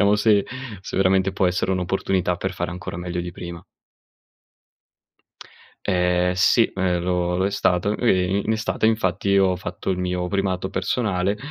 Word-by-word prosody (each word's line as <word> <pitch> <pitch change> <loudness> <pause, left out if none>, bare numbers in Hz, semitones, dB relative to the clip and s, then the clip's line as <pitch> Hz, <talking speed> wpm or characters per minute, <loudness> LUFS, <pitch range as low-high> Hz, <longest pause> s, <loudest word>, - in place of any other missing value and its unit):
vediamo 100 0 +5
se 105 -1 +3 0.4
se - - -7
veramente 95 0 +3
può 95 -1 +1
essere 90 +1 0
un'opportunità 90 -1 0
per 95 +2 -3
fare 85 -1 -3
ancora 85 -1 -6
meglio 90 0 -3
di 90 0 -6
prima." 85 -1 -8 2.2
Ehm, 90 -1 +2
sì, 105 +5 +4
ehm, 90 -2 0
lo 90 0 0
lo 95 - +1
è - - -1
stato. 100 0 +1
Ehm, 95 -5 +2
i 100 - -1
in 110 - +2
estate 110 0 0
infatti, 100 -2 +1
ho 95 -1 +3
fatto 90 +1 -5
il 90 - -1
mio 90 0 -1
primato 95 -1 -1
personale, 95 0 -1
95 Hz, 160 wpm, -23 LUFS, 90-100 Hz, 2.2 s, vediamo